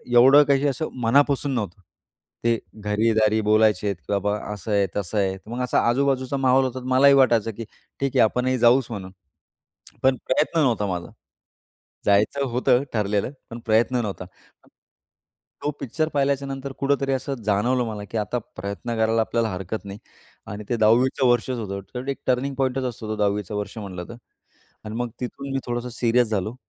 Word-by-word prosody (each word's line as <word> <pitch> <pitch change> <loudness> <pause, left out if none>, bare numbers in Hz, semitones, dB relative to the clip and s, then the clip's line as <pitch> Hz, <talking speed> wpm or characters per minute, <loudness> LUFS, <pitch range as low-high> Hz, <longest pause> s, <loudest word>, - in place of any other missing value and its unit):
एवढं 135 +4 +8
काही 140 +1 +2
असं 140 +4 -2
मनापासून 140 +3 +3
नव्हतं. 100 -4 -4 0.6
ते 115 -1 +2 0.2
घरी-दारी 110 +1 +1
बोलायचे, 105 -2 +3
की 85 - -21
बाबा 105 +1 0 0.2
असं 105 +1 -6
आहे, 100 -1 +3
तसं 105 +1 -2
आहे 95 -1 0
मग 120 +3 -4
असा 125 - +1
आजूबाजूचा 135 +1 +1
माहौल 130 0 +3
होता, 130 0 -3
तर 125 - -11
मलाही 140 +2 +6
वाटायचं, 115 -4 +3
की 115 +2 -7 0.4
ठीक 140 -1 0
आहे - - +6
आपणही 125 +3 +1
जाऊच 125 +2 +5
म्हणून, 95 -4 -6 0.9
पण 130 0 +4
प्रयत्न 155 +5 +1
नव्हता 120 -8 +2
माझा. 90 -2 -4 0.9
जायचं 105 +8 +2
होतं 125 +2 +2
ठरलेलं, 105 +2 0 0.2
पण 115 +1 -7
प्रयत्न 115 +3 +2
नव्हता. 100 -4 -5 1.4
तो 145 - 0
पिक्चर 155 +4 -1
पाहिल्याच्यानंतर 140 -1 -1
कुठेतरी 140 0 +1
असं 135 +1 -2
जाणवलं 120 +5 +2
मला, 105 -2 -5
की 115 - -2
आता 105 +4 -1 0.2
प्रयत्न 100 +5 -4
करायला 110 0 +2
आपल्याला 115 0 0
हरकत 95 +4 -5
नाही 100 +1 -8 0.5
आणि 105 +1 -6
ते 120 - +1
10वी 115 +4 +4
चं 130 - +4
वर्षच 120 +1 +1
होतं 100 -2 -4 0.2
तर 125 +2 -5
एक 135 - -2
टर्निंग 130 +2 0
पॉइंटच 130 0 0
असतो 115 -3 -5
तो 110 - -1
10वी 105 0 +1
चं 105 +3 -7
वर्ष 105 +2 -5
म्हंटलं 95 -4 -6
तर 120 - -8 0.7
आणि 105 - -6
मग 120 0 -2
तिथून 135 +2 -5
मी 135 - 0
थोडंस 120 0 -3
सीरियस 120 0 +3
झालो 105 +1 -2
115 Hz, 170 wpm, -23 LUFS, 105-130 Hz, 1.4 s, एवढं